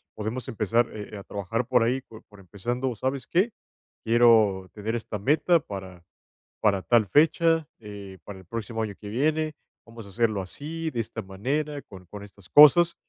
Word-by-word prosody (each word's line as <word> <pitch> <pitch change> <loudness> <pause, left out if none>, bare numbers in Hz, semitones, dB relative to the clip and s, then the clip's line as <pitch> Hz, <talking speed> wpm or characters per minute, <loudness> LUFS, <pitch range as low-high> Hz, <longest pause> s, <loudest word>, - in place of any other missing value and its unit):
podemos 110 +5 -5
empezar, 115 +1 +1
eh, 105 0 -8
a 100 - -9
trabajar 100 +5 -3
por 125 -3 +3
ahí, 125 +3 0
por 110 -3 -15
por 105 -2 -17
empezando, 120 +7 -3
¿sabes 130 +4 -3
qué? 195 +7 +1 0.5
Quiero 110 -5 +4
tener 110 +2 -3
esta 110 -2 -5
meta 160 - +3
para 95 - -9 0.6
para 100 -3 +2
tal 115 -1 +3
fecha, 165 - +3
eh, 100 -3 -10
para 100 -2 -9
el 95 - -14
próximo 115 +2 -4
año 105 -2 -4
que 105 - -8
viene, 155 +7 0 0.3
vamos 115 -2 -11
a - - -12
hacerlo 110 -1 0
así, 160 - -6
de 120 - -2
esta 115 0 -5
manera, 140 +10 -3
con 90 -2 -14
con 100 +3 -10
estas 100 -2 -17
cosas, 170 +4 +7
115 Hz, 175 wpm, -26 LUFS, 100-135 Hz, 0.6 s, cosas